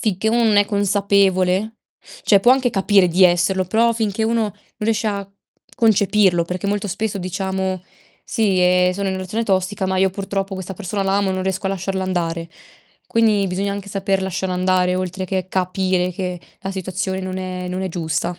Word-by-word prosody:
sicchè 215 -1 0
non 230 -3 +3
è 205 - +6
consapevole 200 0 +2 0.5
cioè 200 - +5
può 245 +5 +6
anche 260 -2 +2
capire 195 -2 +3
di 185 +2 +4
esserlo, 180 +2 +3
però 230 +5 +2
finché 220 -2 -1
uno 230 0 +1
non 210 - -2 0.3
riesce 220 +1 0
a 200 -1 -4 0.5
concepirlo, 205 -6 +3
perché 180 +3 -4
molto 205 0 -1
spesso 200 +2 -2
diciamo: 190 0 -3 0.4
"Sì, 200 -6 +1
ehm, 180 0 +4
sono 200 +2 -4
in 190 - -1
una 190 - -4
relazione 200 +5 -3
tossica, 190 0 0
ma 190 0 -1
io 190 0 +3
purtroppo 195 0 -3
questa 190 0 -6
persona 200 +1 -3
la 195 0 +1
amo 200 -1 +1
e - - 0
non 185 0 -2
riesco 190 +1 -2
a 195 - 0
lasciarla 190 0 -2
andare." 170 -2 -2 0.6
Quindi 215 -3 +2
bisogna 195 +2 -1
anche 200 0 -6
saper 195 0 -1
lasciare 190 0 -2
andare, 180 0 +2
oltre 185 0 -3
che 185 0 -3
capire 185 -1 0
che 180 -1 -4 0.2
la 195 - -4
situazione 190 0 -3
non 185 0 -4
è 185 -1 -5
non 185 +1 -3
è 190 - -2
giusta. 165 0 -2
190 Hz, 190 wpm, -20 LUFS, 185-200 Hz, 0.6 s, è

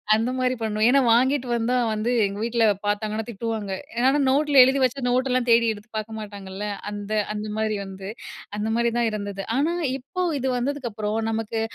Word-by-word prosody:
அந்த 230 +3 0
மாரி 255 0 +1
பண்ணுவேன். 215 0 +1
ஏன்னா 275 +2 +5
வாங்கிட்டு 260 +2 +2
வந்தா 235 +2 +1 0.2
வந்து, 215 +2 -1 0.2
எங்க 200 0 -4
வீட்ல 235 -1 +2 0.2
பாத்தாங்கன்னா 215 +1 -1
திட்டுவாங்க. 220 -2 -4 0.3
ஏன்னா 255 +2 +4 0.2
நோட்ல 285 0 +4
எழுதி 265 +2 +3
வச்சா 255 +2 0
நோட்டெல்லாம் 255 0 +1
தேடி 230 0 +5
எடுத்து 210 +1 -14
பாக்க 215 +1 -4
மாட்டாங்கல்ல. 200 -1 -7 0.2
அந்த 205 0 -6 0.2
அந்த 210 0 -4
மாரி 220 -1 0
வந்து 195 0 -8 0.5
அந்த 215 +1 -1
மாரி 235 0 +2
தான் 235 -1 +2
இருந்தது. 200 -2 -4
ஆனா 305 +5 +1 0.2
இப்போ, 365 +8 -5 0.2
இது 265 - -1
வந்ததுக்கு 265 0 -2
அப்புறம் 210 +1 -2
நமக்கு 225 0 -2
225 Hz, 175 wpm, -24 LUFS, 210-255 Hz, 0.5 s, ஏன்னா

